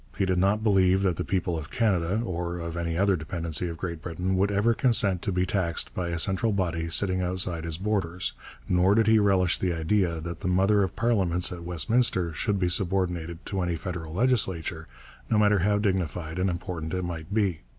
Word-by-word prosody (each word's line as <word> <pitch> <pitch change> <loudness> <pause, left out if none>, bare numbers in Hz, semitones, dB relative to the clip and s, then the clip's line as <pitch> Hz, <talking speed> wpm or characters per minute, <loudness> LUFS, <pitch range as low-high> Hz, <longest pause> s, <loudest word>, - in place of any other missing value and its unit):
He 100 - +1
did 90 -1 +1
not 100 +3 +2
believe 95 -2 +3
that 90 -4 +1
the - - -1
people 90 -2 -1
of 75 - -9
Canada 100 -3 +1
or 85 -2 -3
of 85 -1 -5
any 85 -1 -2
other 100 +1 +3
dependency 85 0 -1
of 85 -1 -6
Great 85 -2 -5
Britain 90 +3 -2
would 100 +2 +2
ever 105 +4 +2
consent 110 -7 +3
to 100 - -2
be 90 0 +1
taxed 90 -3 -1
by 90 -1 -3
a 85 0 -2
central 95 +5 +1
body 85 -4 -1
sitting 95 +2 +2
outside 90 -2 -2
its 80 -2 -1
borders, 95 -3 -2 0.3
nor 90 +2 +3
did 115 0 +4
he 110 +1 +5
relish 95 -3 +2
the 90 -2 0
idea 85 +1 0
that 85 +1 -6
the - - -4
mother 95 +3 +3
of 95 - -1
parliaments 95 -7 +1
at 90 -1 -7
Westminster 90 +1 +1
should 105 +4 -1
be 90 - +1
subordinated 90 -2 -1
to 95 -2 -3
any 90 -1 -1
federal 85 -1 -6
legislature, 100 -8 0 0.4
no 110 - +2
matter 105 -1 +4
how 105 +3 +2
dignified 90 -4 -2
and 95 +1 +1
important 85 -1 -4
it 90 - -2
might 85 0 -6
be. 100 -6 0
90 Hz, 200 wpm, -26 LUFS, 85-100 Hz, 0.4 s, he